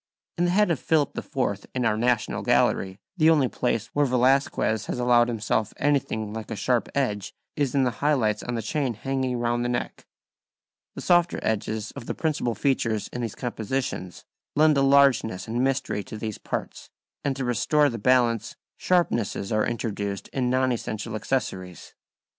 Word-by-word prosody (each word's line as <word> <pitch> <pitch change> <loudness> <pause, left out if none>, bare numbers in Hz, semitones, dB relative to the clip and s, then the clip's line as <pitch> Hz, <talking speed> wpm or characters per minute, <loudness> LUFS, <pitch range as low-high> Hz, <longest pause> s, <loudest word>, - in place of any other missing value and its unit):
In 175 - +3
the - - +2
head 205 +1 +3
of 160 - 0
Philip 155 -3 +1
IV 100 -7 -3
in 125 -2 0
our 105 - +2
National 120 0 0
Gallery 95 0 +2 0.2
the 160 -1 +5
only 150 -5 +4
place 115 -2 -2
where 145 -1 +2
Velazquez 125 -4 +2
has - - -3
allowed 120 -1 +4
himself 110 -2 -1
anything 125 -7 0
like 110 -1 -6
a - - -3
sharp 120 +4 0
edge 105 -8 -1 0.2
is 140 -3 -1
in 135 - +4
the 125 - +1
high 150 +1 +3
lights 110 -5 0
on 120 - -4
the 115 - -3
chain 135 -1 -1
hanging 130 +1 -2
round 120 0 0
the 120 - -1
neck. 120 0 -4 0.9
The - - -6
softer 175 0 +3
edges 110 0 -2
of 115 - -9
the - - -3
principal 145 -7 -1
features 115 -6 0
in 125 - -5
these 115 -4 -4
compositions 120 -5 -4 0.3
lend 155 0 +5
a 140 - +3
largeness 135 -8 +3
and 120 +3 -1
mystery 135 -6 -1
to 110 - -8
these 110 -1 -5
parts, - - -5 0.3
and 140 -2 0
to 135 -1 -3
restore 145 +5 +2
the 115 -4 -3
balance, 115 -1 +2 0.2
sharpnesses 120 - 0
are 110 -1 +2
introduced 100 -4 -3
in 125 -2 -1
non 130 0 +2
essential 110 -1 -4
accessories. 95 -6 -3
120 Hz, 175 wpm, -25 LUFS, 110-135 Hz, 0.9 s, the